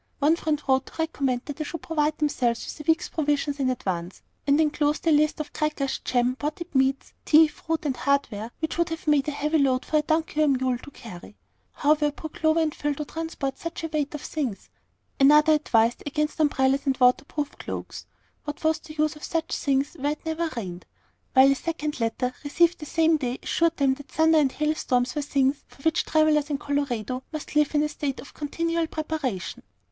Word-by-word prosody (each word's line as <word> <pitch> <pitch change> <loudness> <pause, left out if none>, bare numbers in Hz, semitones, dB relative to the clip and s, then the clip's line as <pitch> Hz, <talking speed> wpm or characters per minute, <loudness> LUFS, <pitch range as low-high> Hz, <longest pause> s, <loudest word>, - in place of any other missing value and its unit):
One 300 +3 +3
friend 310 -3 -1
wrote 265 0 +2
to - - -13
recommend 275 -6 -1
that 290 -1 -6
they 310 - -2
should 325 +2 -6
provide 305 -1 0
themselves 250 -6 0
with - - -16
a 300 - -6
week's 325 +2 +3
provisions 290 -2 -1
in 265 -2 +1
advance, 185 -7 -3 0.2
and 285 +2 +4
enclosed 300 0 +1
a 330 - +4
list 305 +1 +3
of 300 -1 -5
crackers, 300 -3 -1
jam, 250 0 +1
potted 305 +4 -5
meats, 265 0 +1
tea, 315 +1 +6
fruit, 320 +1 -4
and 275 -3 0
hardware, 245 -5 0
which 320 +1 -2
would 340 - +2
have 325 0 -5
made 295 -2 +3
a - - 0
heavy 300 +2 0
load 260 -2 +2
for 310 - +1
a - - +4
donkey 315 0 0
or 305 - +4
mule 260 -3 +1
to 285 - -11
carry. 210 -7 -11 0.4
How 295 +1 +3
were 300 -1 +1
poor 310 +2 -8
Clover 315 +1 +2
and 310 -2 0
Phil 295 -1 -2
to 300 - -4
transport 305 -4 -4
such 335 0 -6
a 325 - -2
weight 300 -1 -2
of 295 - -6
things? 265 -10 -4 0.5
Another 300 +3 +6
advised 235 -6 +2
against 300 +2 -1
umbrellas 275 -2 +2
and 265 -1 +2
water 250 +1 +4
proof 295 -1 -4
cloaks, - - -6 0.4
what 295 +1 -6
was 315 0 +2
the 310 -2 -12
use 305 0 +1
of 300 - -14
such 330 -1 -2
things 275 0 0
where 290 +2 0
it 300 - -15
never 320 +1 -1
rained? 180 -5 -6 0.5
while 265 +1 +7
a - - +5
second 300 0 -3
letter, 240 +2 -1
received 340 +4 +2
the 300 - -7
same 320 +1 +3
day, 255 -3 -3
assured 335 0 +1
them 275 -2 +3
that 285 +1 -10
thunder 320 +3 +4
and 275 -3 +2
hail 300 0 +1
storms 250 -4 0
were 295 - -1
things 275 -1 +1
for 275 - -19
which 320 +1 +2
travellers 310 -1 +3
in 290 - 0
Colorado 260 -4 -2
must 310 -1 -7
live 300 0 +3
in 295 - +4
a - - +1
state 290 -2 -4
of - - -11
continual 330 +2 -1
preparation. 305 - -3
295 Hz, 210 wpm, -25 LUFS, 270-315 Hz, 0.5 s, while